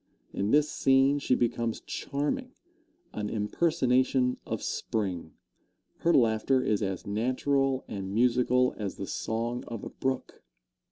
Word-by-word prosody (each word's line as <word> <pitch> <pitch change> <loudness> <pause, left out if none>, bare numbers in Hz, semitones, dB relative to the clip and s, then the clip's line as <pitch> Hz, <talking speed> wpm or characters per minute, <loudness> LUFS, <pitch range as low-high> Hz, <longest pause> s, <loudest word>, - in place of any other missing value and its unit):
In 100 +1 -1
this 150 +4 +4
scene 135 +2 +3
she 130 - +2
becomes 115 -1 -1
charming 250 - -3 0.6
an 105 -1 -3
impersonation 130 +1 +1
of - - -3
Spring. 90 -7 -3 0.6
Her 170 - +2
laughter 120 0 +3
is 105 -1 +1
as 95 -3 -3
natural 130 +5 0
and 95 -2 -5
musical 125 +3 +3
as 100 -2 -3
the 95 - -5
song 115 +4 -3
of 115 -3 -6
a - - -5
brook. 130 -1 -3
125 Hz, 125 wpm, -29 LUFS, 110-135 Hz, 0.6 s, this